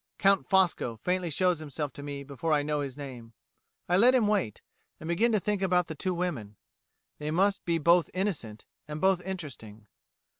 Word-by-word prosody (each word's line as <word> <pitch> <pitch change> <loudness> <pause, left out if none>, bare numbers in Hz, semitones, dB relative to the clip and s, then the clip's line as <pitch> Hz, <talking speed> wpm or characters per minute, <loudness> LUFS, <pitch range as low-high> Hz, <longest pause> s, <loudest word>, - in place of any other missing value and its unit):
Count 195 0 +3
Fosco 180 - +2
faintly 180 -1 0
shows 180 +2 +1
himself 150 -2 -4
to - - -9
me 140 -1 -6
before 145 +3 -2
I 145 -1 +2
know 150 0 -1
his 140 -1 -5
name. 125 -5 -9 0.5
I 180 - +3
let 245 +6 +6
him 240 -4 +4
wait, 200 - -1 0.4
and 160 - -8
begin 215 +8 +2
to 215 - +3
think 205 0 -1
about 180 -2 +2
the 160 - -6
two 180 +4 -2
women. 145 - -3 0.6
They 150 0 -3
must 195 +5 +2
be 170 -1 +1
both 170 +2 +4
innocent, 165 - -3 0.2
and 150 0 -5
both 190 0 +3
interesting. 135 - -7
165 Hz, 185 wpm, -29 LUFS, 145-190 Hz, 0.6 s, let